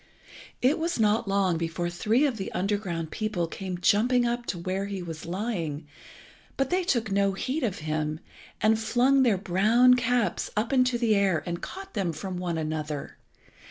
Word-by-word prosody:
It 270 Hz, +6 st, +3 dB
was 335 Hz, -3 st, -1 dB
not 215 Hz, +1 st, +2 dB
long 195 Hz, -4 st, +1 dB
before 170 Hz, +1 st, -2 dB
three 215 Hz, +10 st, +1 dB
of 265 Hz, -6 st, -1 dB
the 195 Hz, -, -5 dB
underground 185 Hz, -5 st, -2 dB
people 215 Hz, -6 st, -1 dB
came 185 Hz, +2 st, -5 dB
jumping 240 Hz, +7 st, +3 dB
up 240 Hz, 0 st, -2 dB
to 180 Hz, -, -2 dB
where 185 Hz, +3 st, -2 dB
he 195 Hz, -2 st, -4 dB
was 165 Hz, -2 st, -7 dB
lying, 170 Hz, -6 st, -3 dB, 0.7 s
but 270 Hz, -1 st, 0 dB
they 365 Hz, +1 st, +2 dB
took 235 Hz, -, 0 dB
no 200 Hz, 0 st, +2 dB
heed 260 Hz, +10 st, -2 dB
of 210 Hz, -6 st, -1 dB
him, 155 Hz, 0 st, -2 dB, 0.4 s
and 220 Hz, 0 st, +3 dB
flung 250 Hz, +5 st, +3 dB
their 230 Hz, -7 st, +3 dB
brown 215 Hz, +7 st, +4 dB
caps 245 Hz, -2 st, +1 dB
up 225 Hz, +4 st, 0 dB
into 255 Hz, -2 st, +3 dB
the 235 Hz, -2 st, +2 dB
air, 195 Hz, -5 st, +2 dB
and 170 Hz, -1 st, -4 dB
caught 390 Hz, +1 st, -8 dB
them 180 Hz, -4 st, -1 dB
from 185 Hz, +4 st, -5 dB
one 175 Hz, -2 st, -2 dB
another. 155 Hz, -2 st, -4 dB
200 Hz, 175 wpm, -27 LUFS, 175-240 Hz, 0.7 s, brown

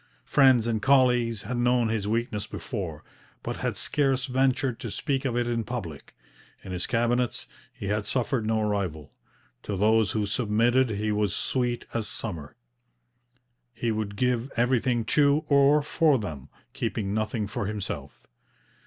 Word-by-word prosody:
Friends 130 Hz, -5 st, +5 dB
and 115 Hz, -2 st, -1 dB
colleagues 125 Hz, -4 st, +3 dB
had 125 Hz, -, -3 dB
known 120 Hz, -1 st, +2 dB
his 110 Hz, -2 st, -1 dB
weakness 110 Hz, -1 st, -1 dB
before, 90 Hz, -, -5 dB, 0.4 s
but -, -, -4 dB
had -, -, -2 dB
scarce 135 Hz, -3 st, +1 dB
ventured 130 Hz, -1 st, +1 dB
to 115 Hz, -, -5 dB
speak 135 Hz, +6 st, -2 dB
of 120 Hz, -2 st, 0 dB
it 120 Hz, -, +1 dB
in 115 Hz, -1 st, -1 dB
public. 100 Hz, -, -7 dB, 0.5 s
In 95 Hz, -, -8 dB
his 90 Hz, -1 st, -3 dB
cabinets 120 Hz, +1 st, 0 dB, 0.3 s
he -, -, -9 dB
had 105 Hz, 0 st, -1 dB
suffered 125 Hz, -1 st, 0 dB
no 110 Hz, 0 st, 0 dB
rival. 90 Hz, -8 st, -3 dB, 0.5 s
To 100 Hz, -, -4 dB
those 110 Hz, +1 st, +3 dB
who 105 Hz, -1 st, 0 dB
submitted 120 Hz, +4 st, +2 dB
he 105 Hz, 0 st, -1 dB
was 105 Hz, -2 st, 0 dB
sweet 120 Hz, -2 st, -1 dB
as 115 Hz, -2 st, -1 dB
summer. 80 Hz, -10 st, -6 dB, 1.2 s
He 115 Hz, 0 st, -1 dB
would 105 Hz, -2 st, -3 dB
give 125 Hz, +2 st, 0 dB
everything 120 Hz, -1 st, +2 dB
to 145 Hz, +5 st, +3 dB
or 140 Hz, +1 st, +5 dB
for 155 Hz, -1 st, +3 dB
them, 75 Hz, -, -6 dB, 0.2 s
keeping 100 Hz, -2 st, -2 dB
nothing 110 Hz, 0 st, -1 dB
for 100 Hz, 0 st, -3 dB
himself. 95 Hz, -9 st, -5 dB
115 Hz, 150 wpm, -27 LUFS, 105-125 Hz, 1.2 s, Friends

